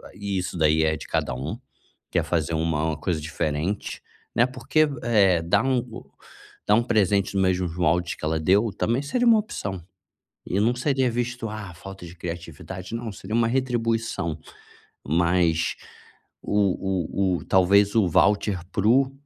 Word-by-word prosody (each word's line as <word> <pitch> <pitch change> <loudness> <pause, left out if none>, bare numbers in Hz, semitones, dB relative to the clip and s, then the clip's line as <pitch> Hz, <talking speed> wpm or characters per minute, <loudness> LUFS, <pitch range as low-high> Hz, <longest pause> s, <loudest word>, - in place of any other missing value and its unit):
e 100 -1 -3
isso 90 -1 -3
daí 80 0 +3
é 80 0 +2
de - - -9
cada - - -1
um. 65 - -4 0.5
Quer - - +1
fazer 85 -2 -1
um 80 - 0
uma 80 -1 0
coisa 80 0 -2
diferente, 80 +4 -3 0.3
né, 120 - +5
porque, 155 +4 +1 0.2
eh, 100 -7 +4
dar 85 +1 +2
um 130 -2 +2
o 120 -2 -9 0.6
dar 105 - +5
um 115 - +3
presente 100 -4 +2
nos 95 - +3
mesmos 90 -2 0
moldes 85 0 +1
que - - -17
ela 80 +1 0
deu, 100 +7 +3
também 115 +6 0
seria 240 - 0
uma 230 -2 +7
opção. 100 - -5 0.6
E 95 - -1
não 120 +3 +3
seria 130 -1 +1
visto: 120 0 -3
"ah! 100 -5 -7
falta 95 0 -10
de 85 - -11
criatividade", 85 +3 -7
não, 115 -2 -4
seria 110 +3 -7
uma 115 -1 +3
retribuição. 115 - -1 0.7
Mas 85 0 +2 0.7
o 95 -2 0
o - - -1
o - - -10
talvez 100 +2 +4
o 105 -5 +4
voucher 100 +2 +2
para 100 +2 0
o 135 +3 +4
95 Hz, 165 wpm, -24 LUFS, 85-115 Hz, 0.7 s, uma